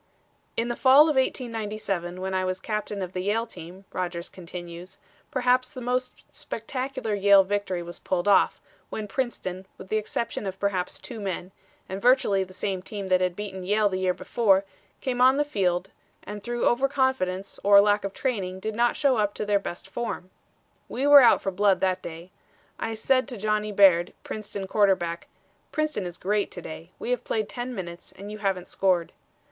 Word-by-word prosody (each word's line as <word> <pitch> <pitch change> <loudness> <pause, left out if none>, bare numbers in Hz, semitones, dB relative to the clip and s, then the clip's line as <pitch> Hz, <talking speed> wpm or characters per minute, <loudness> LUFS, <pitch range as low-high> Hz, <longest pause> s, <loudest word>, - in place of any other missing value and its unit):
"In 230 - +1
the 240 - -2
fall 265 +3 +7
of 305 -1 +4
1897 215 -8 -2
when 190 +1 -3
I 185 0 +1
was 185 0 -2
captain 210 -2 -3
of 180 0 -6
the 185 - -3
Yale 215 +4 0
team," 185 -2 -11
Rodgers 175 -2 -3
continues, 175 0 -9 0.3
"perhaps 255 -1 +2
the - - -7
most 250 +1 -2
spectacular 255 -1 -4
Yale 200 -1 +6
victory 190 -2 -2
was 170 0 -9
pulled 180 0 -1
off, 200 - +4 0.3
when 215 -1 -4
Princeton, 190 -7 -3
with 190 - -11
the 215 - +1
exception 215 -1 -3
of 190 0 -4
perhaps 190 -2 -1
two 235 -3 -8
men, 190 -2 -4 0.4
and 190 +1 -5
virtually 240 -6 +4
the 185 - -12
same 185 0 -3
team 200 0 -6
that 185 0 +4
had 180 -1 0
beaten 190 -2 -6
Yale 205 +2 +2
the 185 -1 -2
year 185 -1 +1
before, 200 -4 +2 0.4
came 250 -2 -1
on 260 +2 +6
the 295 - +2
field 190 -7 0 0.3
and 210 0 -7
through 240 +2 -2
overconfidence 260 -7 +1
or 200 0 +8
lack 205 0 +3
of 195 - -3
training 190 -7 -2
did 220 +3 -3
not 240 +1 +2
show 275 -4 +3
up 205 -1 0
to - - -3
their 205 -1 +3
best 175 -3 -7
form. 210 -6 -5 0.6
We 265 - -2
were 290 -1 +10
out 240 - +5
for 195 - 0
blood 195 0 +3
that 185 -1 +1
day. 170 +2 -9 0.5
I 225 0 -2
said 255 +4 +2
to 250 -4 -7
Johnny 215 +1 0
Baird, 190 -4 +5
Princeton 205 -2 -5
quarterback: 190 -4 +1 0.4
'Princeton 305 - -1
is 175 0 -8
great 205 +2 0
to 180 - -7
day. 160 +2 -8
We 245 - -4
have 250 - 0
played 215 -2 -1
ten 245 0 -5
minutes 175 -3 -7
and 200 +2 -9
you 215 - -7
haven't 195 -3 -1
scored.' 180 -3 +1
200 Hz, 185 wpm, -26 LUFS, 185-235 Hz, 0.6 s, were